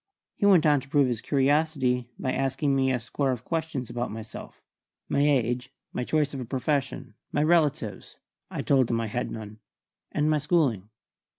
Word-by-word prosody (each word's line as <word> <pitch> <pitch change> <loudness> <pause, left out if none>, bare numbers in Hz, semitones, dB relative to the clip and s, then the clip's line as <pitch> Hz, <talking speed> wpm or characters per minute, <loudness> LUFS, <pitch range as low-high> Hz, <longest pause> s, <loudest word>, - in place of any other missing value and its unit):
He 200 - +1
went 180 -6 +6
on 145 -2 +5
to 135 - -15
prove 145 -2 +4
his 120 -3 -2
curiosity 135 -3 +1
by 130 - -2
asking 135 +1 0
me 130 -1 +2
a 125 - 0
score 135 +4 -2
of 125 -2 -3
questions 160 -6 -2
about 120 +2 -3
myself: 110 +1 -9 0.4
my - - 0
age, 125 -3 +1 0.2
my 125 - -2
choice 150 +2 0
of 135 - -4
a 125 - -4
profession, 135 -1 -2 0.2
my 145 - +1
relatives 155 -3 +1 0.3
(I - - -4
told 130 -4 +3
him 115 - +1
I 115 - -1
had 120 +3 -3
none), 110 -1 -8 0.5
and 150 - +1
my 155 -1 +3
schooling. 140 - +1
135 Hz, 180 wpm, -27 LUFS, 125-150 Hz, 0.5 s, went